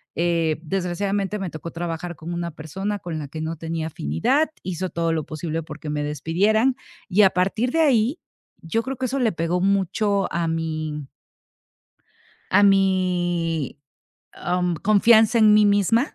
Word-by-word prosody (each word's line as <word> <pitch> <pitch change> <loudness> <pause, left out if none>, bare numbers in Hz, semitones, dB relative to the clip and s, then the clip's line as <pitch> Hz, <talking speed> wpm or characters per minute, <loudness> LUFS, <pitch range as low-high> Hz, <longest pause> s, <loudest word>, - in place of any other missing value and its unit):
eh, 165 -2 +1
desgraciadamente 195 +3 -2
me 190 -2 -3
tocó 160 +1 -8
trabajar 170 0 -5
con 170 +2 -6
una 170 -1 -3
persona 190 +7 -4
con 165 -4 -5
la 145 - -7
que 155 - -7
no 160 +1 -3
tenía 160 0 -4
afinidad, 145 - 0
hizo 185 +1 -3
todo 165 -1 -1
lo 160 -1 -1
posible, 160 +1 -4
porque 150 0 -8
me 150 0 -2
despidieran, 195 - +1 0.3
y 200 +4 +3
a 195 - +7
partir 195 +7 0
de 325 - 0
ahí, 265 -1 +3 0.4
yo 225 +8 -1
creo 265 0 -5
que 260 - -2
eso 265 +2 -1
le 230 -3 +2
pegó 165 +1 -1
mucho 200 +1 +1
a 170 0 0
mi 155 -3 -3 1.4
a 205 +2 +5
mi, 175 -6 +1 0.5
am, 180 0 -1
confianza 220 +4 +4
en 215 -1 +6
mí 210 0 +6
misma, 205 - +2
175 Hz, 155 wpm, -23 LUFS, 165-205 Hz, 1.4 s, a